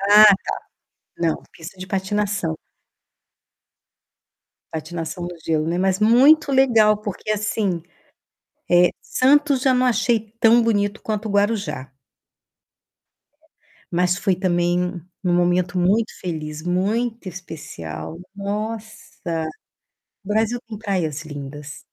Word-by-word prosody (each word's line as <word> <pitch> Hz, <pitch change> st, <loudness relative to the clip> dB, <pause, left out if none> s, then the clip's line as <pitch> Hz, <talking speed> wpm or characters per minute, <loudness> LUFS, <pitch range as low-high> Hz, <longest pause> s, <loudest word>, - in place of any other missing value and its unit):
Ah, 205 Hz, +2 st, +7 dB
tá. 210 Hz, -2 st, +9 dB, 0.8 s
Não, 165 Hz, -2 st, -1 dB
pista 170 Hz, +3 st, -11 dB
de 185 Hz, -, -7 dB
patinação. 195 Hz, -3 st, -1 dB, 2.1 s
Patinação 165 Hz, +2 st, -5 dB
no 175 Hz, 0 st, -6 dB
gelo, 155 Hz, -1 st, 0 dB
né. 170 Hz, +2 st, -1 dB
Mas 190 Hz, +1 st, +1 dB
muito 275 Hz, +7 st, +5 dB
legal, 230 Hz, -6 st, +5 dB
porque 210 Hz, 0 st, -5 dB
assim, 205 Hz, -4 st, -1 dB, 0.9 s
eh, 175 Hz, 0 st, +6 dB
Santos 280 Hz, +1 st, +3 dB
já 260 Hz, -1 st, +3 dB
não 255 Hz, 0 st, +2 dB
achei 240 Hz, -1 st, +2 dB, 0.2 s
tão 230 Hz, +1 st, +6 dB
bonito 205 Hz, -2 st, 0 dB
quanto 215 Hz, 0 st, -3 dB
Guarujá. 205 Hz, -, 0 dB, 2.0 s
Mas 180 Hz, +1 st, +1 dB
foi 190 Hz, +1 st, +1 dB
também 175 Hz, 0 st, 0 dB, 0.2 s
um 180 Hz, -, +2 dB
momento 175 Hz, +1 st, +1 dB
muito 205 Hz, +6 st, +2 dB
feliz, 155 Hz, -3 st, -5 dB
muito 210 Hz, +5 st, -1 dB
especial. 155 Hz, -, -8 dB, 0.2 s
Nossa! 205 Hz, -5 st, -4 dB, 0.8 s
O -, -, -16 dB
Brasil 220 Hz, +3 st, +1 dB
tem 220 Hz, -2 st, -7 dB
praias 180 Hz, -8 st, -2 dB
lindas. 145 Hz, -1 st, -8 dB
195 Hz, 105 wpm, -22 LUFS, 175-220 Hz, 2.1 s, tá